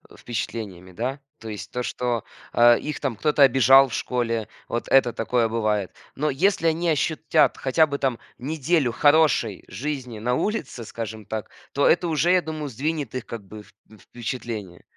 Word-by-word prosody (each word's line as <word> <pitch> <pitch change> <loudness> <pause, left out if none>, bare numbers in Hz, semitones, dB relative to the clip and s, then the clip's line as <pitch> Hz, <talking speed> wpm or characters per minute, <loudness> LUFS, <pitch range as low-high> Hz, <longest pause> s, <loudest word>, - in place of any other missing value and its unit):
впечатлениями, 100 -6 -5
да, 130 +8 -3 0.2
то 115 - -10
есть 105 -3 -7
то, 125 - -3
что, 120 -2 -2 0.3
а, 120 0 +7
их 150 +4 -4
там 135 -5 -2
кто-то 150 +3 +3
обижал 135 +1 +7
в - - -9
школе, 115 -3 -1 0.2
вот 120 - -3
это 130 -2 +5
такое 115 +1 +1
бывает, 110 -4 -1 0.2
но 150 +2 0
если 165 +4 +2
они 165 +2 +1
ощутят 155 0 +2
хотя 155 +4 +3
бы 140 - -3
там 130 -4 -1 0.2
неделю 150 -1 0
хорошей 145 - +3
жизни 125 0 -5
на 125 +3 0
улице, 155 - -2
скажем 110 -1 -7
так, 110 +1 -5 0.2
то 140 - +3
это 175 +1 +3
уже, 160 +3 +2
я 185 -1 +4
думаю, 155 -2 -5
сдвинет 140 0 -3
их 130 - -4
как 110 -4 -8
бы 105 +2 -10
вп - - -22 0.3
впечатление. 115 -6 -6
125 Hz, 170 wpm, -24 LUFS, 115-150 Hz, 0.3 s, а